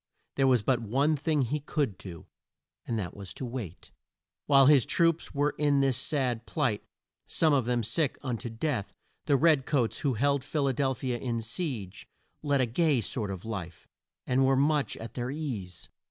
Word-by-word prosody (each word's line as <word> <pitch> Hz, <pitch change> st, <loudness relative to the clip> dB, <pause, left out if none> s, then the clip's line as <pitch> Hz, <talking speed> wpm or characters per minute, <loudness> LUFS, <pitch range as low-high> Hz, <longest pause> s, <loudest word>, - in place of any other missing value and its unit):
There 135 Hz, -1 st, +2 dB
was 125 Hz, -5 st, +3 dB
but 125 Hz, +1 st, +1 dB
one 135 Hz, +8 st, +1 dB
thing 150 Hz, -1 st, 0 dB
he 145 Hz, +5 st, -1 dB
could 145 Hz, -6 st, -2 dB
do, 85 Hz, -4 st, -9 dB, 0.6 s
and 115 Hz, -, -1 dB
that 95 Hz, -5 st, -4 dB
was 100 Hz, -2 st, -9 dB
to 130 Hz, -, -5 dB
wait. 115 Hz, -8 st, -7 dB, 0.6 s
While 135 Hz, -2 st, +6 dB
his 140 Hz, -3 st, +6 dB
troops 165 Hz, -2 st, +1 dB
were 145 Hz, +1 st, +2 dB
in 145 Hz, -2 st, +3 dB
this 135 Hz, -2 st, +2 dB
sad 125 Hz, -3 st, -1 dB
plight 125 Hz, -10 st, -1 dB, 0.4 s
some 160 Hz, -2 st, +2 dB
of 135 Hz, -5 st, +2 dB
them 120 Hz, -1 st, 0 dB
sick 130 Hz, +6 st, 0 dB
un 125 Hz, -4 st, -2 dB
to 120 Hz, -, -5 dB
death 115 Hz, -2 st, -3 dB, 0.3 s
the 140 Hz, -, +4 dB
red 150 Hz, -2 st, +3 dB
coats, 125 Hz, -7 st, +1 dB
who 135 Hz, -4 st, 0 dB
held 140 Hz, +3 st, +1 dB
Phil 145 Hz, 0 st, -1 dB
a 135 Hz, -, +1 dB
del 135 Hz, 0 st, 0 dB
phi 130 Hz, +1 st, -3 dB
a 120 Hz, -, -3 dB
in 115 Hz, -2 st, -2 dB
siege, 115 Hz, -, -5 dB, 0.3 s
led 145 Hz, -3 st, +1 dB
a -, -, +3 dB
gay 140 Hz, +3 st, +2 dB
sort 110 Hz, -1 st, -2 dB
of 95 Hz, 0 st, -6 dB
life, 95 Hz, -7 st, -6 dB, 0.4 s
and 130 Hz, +1 st, +2 dB
were 135 Hz, 0 st, +4 dB
much 145 Hz, +1 st, +1 dB
at 115 Hz, 0 st, -8 dB
their 120 Hz, 0 st, -3 dB
ease. 125 Hz, -, -5 dB
130 Hz, 195 wpm, -29 LUFS, 115-145 Hz, 0.6 s, While